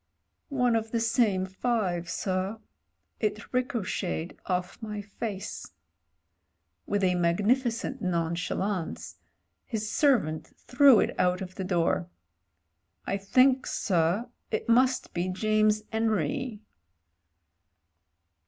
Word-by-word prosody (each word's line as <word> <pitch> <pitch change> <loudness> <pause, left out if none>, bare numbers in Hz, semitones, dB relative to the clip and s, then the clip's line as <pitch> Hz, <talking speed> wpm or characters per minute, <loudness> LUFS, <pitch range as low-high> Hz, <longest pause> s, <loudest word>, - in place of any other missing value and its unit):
"One 250 -4 +2
of 225 0 -1
the 230 - 0
same 225 -5 +2
five, 190 -4 -1
sir. 190 +3 -2 0.6
It 215 +2 -3
ricocheted 210 -9 -2
off 180 +4 -2
my 210 -2 -5
face." 205 - -6 1.1
With 205 -1 0
a 180 -1 +3
magnificent 210 +8 +1
nonchalance 170 - -2 0.5
his 215 -1 -4
servant 225 - +1
threw 260 -2 +6
it - - 0
out 180 0 +2
of 185 -1 -6
the 190 - -5
door. 170 - 0 1.0
"I 195 - -1
think, 255 +7 +3
sir, 180 +5 +1 0.2
it - - -2
must 255 +2 +3
be 175 +2 -1
James 215 +2 +2
'Enry." 220 - -1
205 Hz, 100 wpm, -28 LUFS, 180-230 Hz, 1.1 s, threw